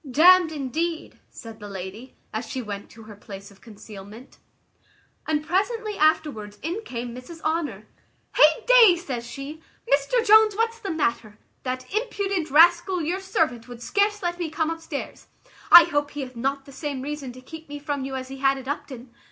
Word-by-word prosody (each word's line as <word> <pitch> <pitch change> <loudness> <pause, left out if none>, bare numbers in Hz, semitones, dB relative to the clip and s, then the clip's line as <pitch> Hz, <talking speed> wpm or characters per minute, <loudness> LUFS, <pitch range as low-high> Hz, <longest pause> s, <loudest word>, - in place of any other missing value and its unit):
"D 285 +5 +2
n'd 365 -2 +7
indeed!" 315 +3 -3
said 225 -2 -11
the 205 -1 -9
lady, 195 +6 -8 0.2
as 220 +2 -3
she 260 - -4
went 205 -4 -6
to 225 - -14
her 215 -1 -12
place 195 0 -11
of 195 - -21
concealment; 210 +1 -12 0.9
and 305 -1 0
presently 420 +5 -1
afterwards 300 - 0
in 345 +8 -3
came 240 - -6
Mrs 255 +7 -10
Honour. 295 - -2 0.5
"Hey 305 +1 +5
day!" 475 -7 +7
says 255 -9 -5
she, 280 +5 -8 0.3
"Mr 285 - +2
Jones, 435 -1 +6
what's 455 +1 -1
the 405 -4 -5
matter? 235 - -2 0.2
That 255 0 -4
impudent 400 -6 -1
rascal 345 +4 +4
your 350 +5 -1
servant 310 -11 -1
would 240 -1 -10
scarce 410 - 0
let 350 0 -2
me 340 -2 -2
come 320 +1 -1
upstairs. 325 -3 -7 0.4
I 345 0 +12
hope 290 -3 -1
he 290 - -6
hath 255 -1 -7
not 270 +3 -2
the 275 - -13
same 275 -1 -5
reason 285 -2 -5
to 255 - -12
keep 320 +3 -11
me 290 - -6
from 290 -2 -4
you 265 0 -5
as 260 0 -5
he 270 - -8
had 270 0 +2
at 260 -1 -9
Upton. 260 -4 -6
290 Hz, 185 wpm, -24 LUFS, 245-345 Hz, 0.9 s, I